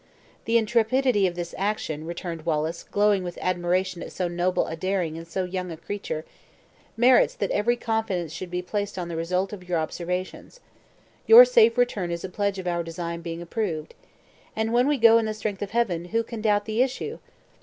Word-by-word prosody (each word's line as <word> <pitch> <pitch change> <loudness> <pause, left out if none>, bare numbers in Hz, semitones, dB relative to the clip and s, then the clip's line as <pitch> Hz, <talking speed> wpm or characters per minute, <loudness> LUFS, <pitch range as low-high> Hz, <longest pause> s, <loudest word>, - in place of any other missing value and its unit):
"The 230 +1 +3
intrepidity 230 -1 +2
of 175 - -4
this 175 -1 -5
action," 165 -6 -2
returned 170 -1 -5
Wallace, 160 +1 -1
glowing 205 -2 +1
with 175 -1 -6
admiration 185 0 -1
at - - -7
so 180 - -2
noble 175 +1 0
a 160 - -5
daring 180 -2 -1
in 165 0 -7
so 175 +3 -3
young 180 0 -4
a 160 - -7
creature, 165 -3 -5 0.7
"merits 245 +2 +5
that 200 - -2
every 235 +4 +2
confidence 220 -9 -2
should 175 +2 -6
be 180 0 -3
placed 205 +2 -3
in 175 -1 -4
the 170 - -4
result 180 +4 -1
of 180 -3 -10
your 175 - +1
observations. 180 - -4 0.7
Your 470 +2 +11
safe 470 - +4
return 215 -7 +1
is 170 0 -4
a 190 - -4
pledge 200 +1 -1
of 185 - -6
our 175 -1 0
design 170 0 -5
being 170 0 -6
approved. 170 -5 -3 0.6
And 220 +1 -1
when 245 +2 +4
we 295 -1 +2
go 230 -1 +7
in 220 - -1
the 215 - -3
strength 210 -2 -4
of 205 - -3
Heaven, 190 -7 0
who 225 +6 0
can 225 -1 -7
doubt 205 -1 +2
the 220 +2 0
issue? 270 - -2
185 Hz, 195 wpm, -25 LUFS, 170-220 Hz, 0.7 s, Your